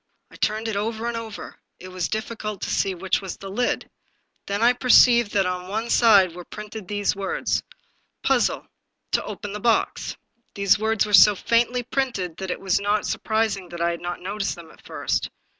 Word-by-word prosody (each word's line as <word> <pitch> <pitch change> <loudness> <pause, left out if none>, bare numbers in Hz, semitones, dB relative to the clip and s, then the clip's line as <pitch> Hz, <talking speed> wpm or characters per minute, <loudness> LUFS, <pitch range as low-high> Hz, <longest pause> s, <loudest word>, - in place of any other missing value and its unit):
I - - -14
turned 215 +1 -1
it 220 - -2
over 220 +2 -2
and 235 - -2
over; 225 -2 -7 0.2
it 185 - -10
was 185 -1 -3
difEcult 215 -2 -4
to - - -3
see 195 -1 0
which 185 +3 -1
was 190 -3 -6
the 195 0 -8
lid. 245 +5 -1 0.6
Then 200 +2 -1
I 245 +1 +6
perceived 240 -3 +5
that 195 -2 +2
on 180 0 -3
one 220 +4 -3
side 200 -7 +5
were 180 +1 -9
printed 210 +1 -9
these 205 0 0
words: 195 -1 -1 0.6
TO - - -1
OPEN 205 -3 -6
THE 210 - -4
BOX 230 +1 0 0.2
" - - -46
The 200 -1 -4
words 220 -1 +1
were 210 - -6
so 205 +1 +8
faintly 240 +4 +1
printed 240 -10 -2
that 190 -1 -5
it - - -3
was 190 -2 +1
not 205 +1 0
sur - - -2
prising 220 -4 -1
that 170 - -8
I 170 0 +1
had 170 - -6
not 175 0 -5
noticed 195 +2 -3
them 170 -2 -13
at - - -20
first. - - -2
205 Hz, 195 wpm, -23 LUFS, 190-225 Hz, 0.6 s, so